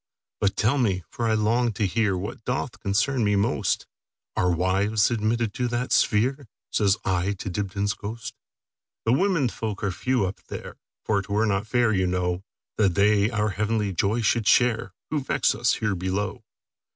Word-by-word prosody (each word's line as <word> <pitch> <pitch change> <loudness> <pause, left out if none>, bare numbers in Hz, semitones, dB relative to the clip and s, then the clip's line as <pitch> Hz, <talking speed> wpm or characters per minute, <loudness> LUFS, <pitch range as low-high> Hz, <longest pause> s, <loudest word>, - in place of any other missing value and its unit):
"But 100 -1 +1
tell 120 +7 +2
me, 95 -7 +1
for 115 - -2
I 110 - +2
long 115 +2 +1
to 105 - -2
hearWhat 100 -2 -1
doth - - -3
concern 115 +6 +1
me 105 -1 +2
most, 100 - 0 0.5
Are 90 - +2
wives 95 +5 +2
admitted 115 -1 0
to 125 - -1
that 120 +1 -2
sphere?"Says 110 -3 +1
I 95 +1 +1
to 95 -1 -6
Dibdin's 100 +1 -1
ghost."The 115 +1 -7
women 180 -3 +2
folk 110 -3 -4
are 100 - +1
few 125 +2 0
up 95 - -5
there; - - -8 0.3
For 100 -2 +1
't 100 - -11
were 105 +2 +2
not 100 0 0
fair, 120 -1 +2
you 95 -2 +1
know, 90 0 -1 0.3
That 100 -5 +2
they 105 +1 +4
our 105 -2 0
heavenly 105 0 -1
joy 105 +7 +1
should 110 +1 +1
shareWho 120 0 +3 0.3
vex - - +2
us 120 +3 +1
here 105 -3 -1
below. 95 +2 -3
105 Hz, 165 wpm, -25 LUFS, 100-115 Hz, 0.5 s, they